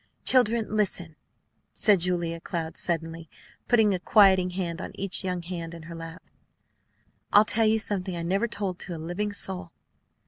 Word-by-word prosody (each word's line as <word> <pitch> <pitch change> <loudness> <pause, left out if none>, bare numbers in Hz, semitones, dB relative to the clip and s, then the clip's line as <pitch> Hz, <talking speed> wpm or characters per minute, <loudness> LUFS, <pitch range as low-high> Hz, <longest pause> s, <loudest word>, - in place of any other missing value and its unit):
"Children, 230 -4 +4
listen!" 180 -6 -1 0.6
said 205 -3 +4
Julia 170 -1 -1
Cloud, 165 -1 -5
suddenly 165 -1 -4 0.4
putting 220 -4 +4
a 185 - -1
quieting 190 -1 +4
hand 180 -1 -4
on - - -7
each 195 0 -2
young 180 -2 -3
hand 170 -1 -6
in 165 - -11
her 170 +1 -9
lap. 165 +1 -9 1.1
"I'll 210 +1 +6
tell 225 +1 +2
you 220 +1 +3
something 190 -4 -1
I 170 - -4
never 195 +7 0
told 200 -5 -4
to 175 - -6
a - - -6
living 175 +6 -3
soul." 190 -3 -2
180 Hz, 165 wpm, -26 LUFS, 170-205 Hz, 1.1 s, I'll